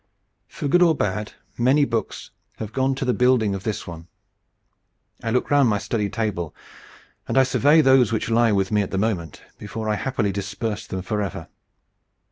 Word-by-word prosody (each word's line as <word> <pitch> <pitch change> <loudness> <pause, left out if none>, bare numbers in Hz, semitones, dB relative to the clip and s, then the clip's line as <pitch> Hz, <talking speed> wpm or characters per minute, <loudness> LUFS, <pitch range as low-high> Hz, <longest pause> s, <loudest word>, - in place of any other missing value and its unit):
For - - -5
good 175 +6 +3
or 165 -3 +5
bad, 105 -2 -2 0.3
many 135 +4 +4
books 115 -3 -4 0.3
have 110 -1 -6
gone 135 0 +1
to 135 0 -3
the 125 - +2
building 125 -5 +2
of 95 - -4
this 105 0 -4
one. 85 -1 -9 1.1
I 115 - -3
look 125 +5 0
round 140 -4 +5
my 105 - +1
study 105 0 -2
table 100 -9 -3 0.7
and - - -1
I 135 - +7
survey 145 +4 +4
those 130 -4 +4
which 110 - -1
lie 115 0 +4
with 95 -1 0
me 105 -1 +3
at 100 - -3
the 95 - -3
moment, 95 -7 -2 0.2
before 110 +1 -6
I 105 - +1
happily 115 -6 -1
disperse 105 +3 -4
them 95 -1 -5
forever. 105 -2 -4
110 Hz, 180 wpm, -23 LUFS, 100-130 Hz, 1.1 s, I